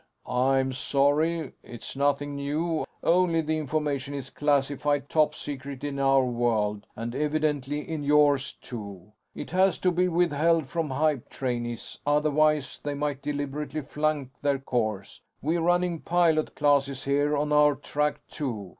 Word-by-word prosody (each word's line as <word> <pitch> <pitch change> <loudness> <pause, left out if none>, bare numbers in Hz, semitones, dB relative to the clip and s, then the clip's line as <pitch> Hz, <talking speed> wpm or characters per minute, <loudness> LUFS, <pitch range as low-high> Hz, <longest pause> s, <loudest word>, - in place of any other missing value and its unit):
"I'm 130 +1 +2
sorry. 145 +4 +1
It's 120 +2 -9
nothing 145 +1 0
new, 155 +4 -1 0.2
only 170 -1 +3
the 155 0 -1
information 145 -2 -2
is 135 -1 -6
classified 145 0 0
top 155 -1 +2
secret 140 -1 -7
in 140 -1 -3
our 135 -1 +4
world; 115 -4 0
and 115 +1 -5
evidently 150 0 -1
in 160 -2 -3
yours, 145 -1 +3
too. 100 -5 -9 0.2
It - - -7
has 185 -1 +3
to 180 - +3
be 180 +1 +2
withheld 165 -2 +2
from 160 +2 -2
hype 145 -1 0
trainees, 120 -3 -4
otherwise 150 0 +2
they 145 -1 -2
might 145 -1 -2
deliberately 145 +1 -3
flunk 150 -1 -2
their 140 -1 +2
course. 110 -7 -3 0.2
We're 165 +4 0
running 175 0 +1
pilot 165 -3 +2
classes 140 -2 +2
here 145 +2 +1
on 150 +1 0
our 150 -1 +5
track, 150 +2 -2
too. 115 - -4
145 Hz, 140 wpm, -27 LUFS, 135-155 Hz, 0.2 s, our